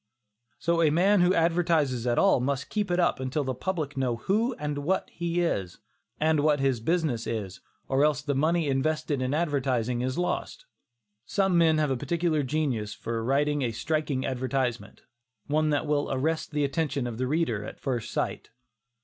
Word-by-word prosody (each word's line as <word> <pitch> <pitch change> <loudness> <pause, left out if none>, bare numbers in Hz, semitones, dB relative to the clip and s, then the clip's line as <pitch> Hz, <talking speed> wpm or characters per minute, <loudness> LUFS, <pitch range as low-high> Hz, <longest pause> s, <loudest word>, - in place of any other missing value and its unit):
So 170 0 +1
a 160 - +5
man 185 +5 +4
who 180 +2 +4
advertises 165 -7 +1
at 120 - +1
all 195 -8 +4
must 140 +2 -2
keep 210 -2 -1
it 175 0 +1
up 175 - +2
until 130 +3 -1
the 130 -1 -2
public 155 0 -3
know 130 -3 0
who 220 - 0
and 150 -4 -3
what 180 +7 -1
he 170 +1 -1
is, 95 - -1 0.4
and 155 0 +2
what 150 0 +3
his 135 -3 +1
business 150 -3 0
is, 100 -5 -4 0.3
or 135 +1 +2
else 150 -1 +2
the 145 -1 -1
money 160 +3 +1
invested 145 0 0
in 130 +3 0
advertising 130 -7 0
is 130 +1 -2
lost. 180 - -2 0.6
Some 195 -3 +1
men 165 -2 +4
have 150 -3 +1
a 130 - 0
peculiar 160 +3 0
genius 130 -7 -1
for 115 -1 -4
writing 145 +3 +1
a 120 -3 0
striking 145 +2 -1
advertisement, 130 -1 -2 0.4
one 155 +1 +1
that 145 +1 +1
will 145 -1 0
arrest 155 +5 -1
the 150 -2 -1
attention 145 -2 -1
of 120 -1 -5
the 130 - 0
reader 130 -8 0
at - - -9
first 125 -5 -3
sight. - - -3
145 Hz, 180 wpm, -27 LUFS, 130-165 Hz, 0.6 s, a